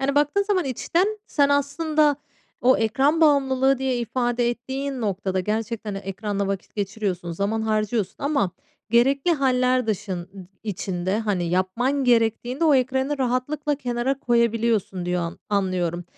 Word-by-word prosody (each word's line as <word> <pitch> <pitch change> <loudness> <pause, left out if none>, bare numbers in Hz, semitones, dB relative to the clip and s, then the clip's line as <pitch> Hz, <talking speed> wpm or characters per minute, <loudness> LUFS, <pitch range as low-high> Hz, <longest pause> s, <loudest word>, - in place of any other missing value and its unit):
Yani, 275 +1 0
baktığın 295 +7 +2
zaman 395 -4 0
içten 330 - 0 0.2
sen 285 -2 +2
aslında 295 +1 +2 0.4
o 255 +2 +5
ekran 270 +8 +2
bağımlılığı 270 -3 +3
diye 260 -2 0
ifade 240 0 0
ettiğin 265 +2 -4
noktada 190 -3 -1
gerçekten 215 +1 -3
de 195 - -3
ekranda 200 +1 -3
vakit 195 -1 -4
geçiriyorsun, 200 -4 -3
zaman 205 +5 -1
harcıyorsun 215 -2 -1
ama 280 -10 0 0.4
gerekli 270 +8 +3
hâller 255 -4 +2
dışın 190 -4 -3 0.3
içinde, 190 -1 -2
hani, 205 -5 -1
yapman 230 +10 0
gerektiğinde 240 +4 +2
o 305 -3 +5
ekranı 265 +2 +1
rahatlıkla 270 +4 0
kenara 250 0 -2
koyabiliyorsun 230 -6 +1
diyor 175 -1 -1 0.2
anlıyorum. 185 -4 -1
240 Hz, 130 wpm, -23 LUFS, 200-275 Hz, 0.4 s, o